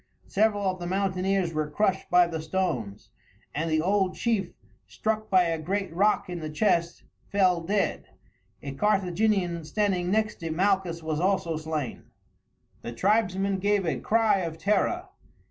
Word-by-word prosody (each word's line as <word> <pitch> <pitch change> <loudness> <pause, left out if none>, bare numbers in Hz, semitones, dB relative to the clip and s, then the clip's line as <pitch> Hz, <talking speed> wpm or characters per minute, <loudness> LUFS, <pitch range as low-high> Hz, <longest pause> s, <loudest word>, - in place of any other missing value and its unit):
Several 205 0 +1
of 185 0 -1
the 175 - -5
mountaineers 190 -1 0
were 155 -1 -1
crushed 190 +4 0
by 180 0 +6
the 165 -2 -4
stones, 155 - -3 0.4
and 160 +3 -2
the 155 0 +2
old 190 +1 +1
chief, 225 -5 0 0.4
struck 215 0 -2
by 185 -1 +5
a 165 -2 -1
great 190 +2 -2
rock 205 +5 +2
in 180 -1 -5
the 155 -1 -5
chest, 170 +1 0 0.3
fell 185 -4 +3
dead. 200 +4 -1 0.6
A 140 - -4
Carthaginian 190 0 +1
standing 180 +1 0
next 215 +2 0
to 165 - -4
Malchus 180 -1 0
was 155 -1 -2
also 180 -3 +1
slain. 155 -3 -4 0.8
The 120 - -6
tribesmen 195 - +1
gave 200 0 +1
a 165 - -1
cry 225 -2 +2
of 165 -3 -4
terror. 200 +6 0
185 Hz, 150 wpm, -27 LUFS, 165-200 Hz, 0.8 s, by